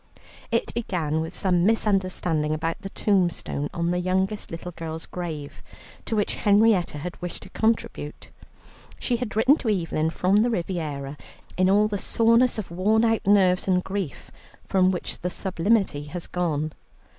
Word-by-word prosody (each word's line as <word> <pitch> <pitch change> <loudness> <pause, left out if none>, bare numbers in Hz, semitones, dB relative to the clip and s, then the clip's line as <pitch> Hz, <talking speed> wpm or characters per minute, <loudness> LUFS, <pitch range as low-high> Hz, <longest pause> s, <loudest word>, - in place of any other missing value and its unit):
It 230 -1 0
began 165 -9 -1
with 160 +3 -5
some 180 -3 +2
misunderstanding 185 -7 +1
about 165 +2 -3
the 195 - -6
tombstone 175 -8 0
on 170 0 -1
the 180 - 0
youngest 190 +3 -1
little 170 +2 -6
girl's 160 -1 -6
grave, 160 -5 -6 0.4
to 225 - -1
which 210 -1 0
Henrietta 205 -5 +3
had 175 +6 -7
wished 175 -1 -5
to - - -13
contribute. 220 -9 -2 0.7
She 245 - 0
had 230 -3 -4
written 255 +7 +5
to 240 - -2
Evelyn 165 -5 0
from 185 +4 +2
the 225 +3 +4
Riviera 155 -8 -3 0.4
in 185 0 +3
all 205 +2 +4
the 205 -2 -3
soreness 230 +5 +3
of 210 -5 -5
worn 210 +6 +2
out 225 -3 +1
nerves 190 -3 +4
and 180 -1 +2
grief 190 -7 -5 0.3
from 185 -1 +3
which 185 -2 -3
the 180 - -2
sublimity 190 -4 0
has 170 +3 -5
gone. 155 -4 -2
185 Hz, 155 wpm, -25 LUFS, 165-210 Hz, 0.7 s, written